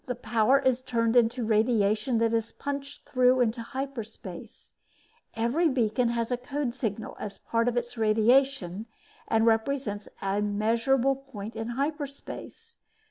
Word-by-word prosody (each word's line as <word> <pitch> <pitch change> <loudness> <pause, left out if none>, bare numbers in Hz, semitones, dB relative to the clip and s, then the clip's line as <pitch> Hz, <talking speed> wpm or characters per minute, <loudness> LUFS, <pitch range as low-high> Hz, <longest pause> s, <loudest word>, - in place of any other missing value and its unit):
This 250 -1 -3
power 225 +3 +4
is 260 -2 +1
turned 230 -2 0
into 240 0 +3
radiation 220 +1 +2
that 230 0 +2
is 225 0 -1
punched 280 0 -6
through 255 0 +4
into 235 -1 +1
hyperspace. 230 -8 -7 0.6
Every 245 +9 +2
beacon 245 -2 +1
has 235 0 -1
a 245 - +1
code 260 0 -3
signal 225 -4 -4
as 200 -2 -6
part 230 +3 -1
of 245 0 0
its 240 -1 -3
radiation 220 -2 +2 0.4
and 225 0 +2
represents 225 -2 0
a 195 +1 -1
measurable 230 +6 +2
point 230 -6 -9
in 225 0 -4
hyperspace. 285 - -5
235 Hz, 135 wpm, -28 LUFS, 220-265 Hz, 0.6 s, power